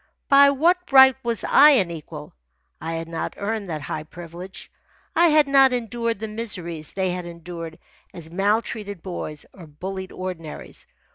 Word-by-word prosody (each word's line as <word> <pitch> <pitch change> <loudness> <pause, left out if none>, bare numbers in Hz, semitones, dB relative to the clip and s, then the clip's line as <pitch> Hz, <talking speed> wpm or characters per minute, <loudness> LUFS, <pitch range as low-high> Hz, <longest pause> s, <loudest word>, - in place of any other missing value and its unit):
By 280 0 +7
what 345 +6 +1
right 265 -1 +8
was 235 -3 -2
I 290 +2 +7
an 190 -10 +2
equal? 150 -2 -9 0.5
I 165 +1 -4
had 165 0 -4
not 165 0 -4
earned 210 0 -3
that 155 -4 -5
high 155 - -4
privilege. 175 +4 -10 0.4
I 345 - +5
had 305 -2 +4
not 270 -2 +5
endured 230 -1 -2
the 220 +2 -5
miseries 180 -8 -4
they 190 -2 -1
had 180 -1 -5
endured 170 -1 -8 0.3
as 165 -2 -8
maltreated 205 0 -1
boys 155 -5 -6
or 175 -4 -13
bullied 190 +5 -7
ordinaries. 180 -4 -7
190 Hz, 155 wpm, -23 LUFS, 165-235 Hz, 0.5 s, right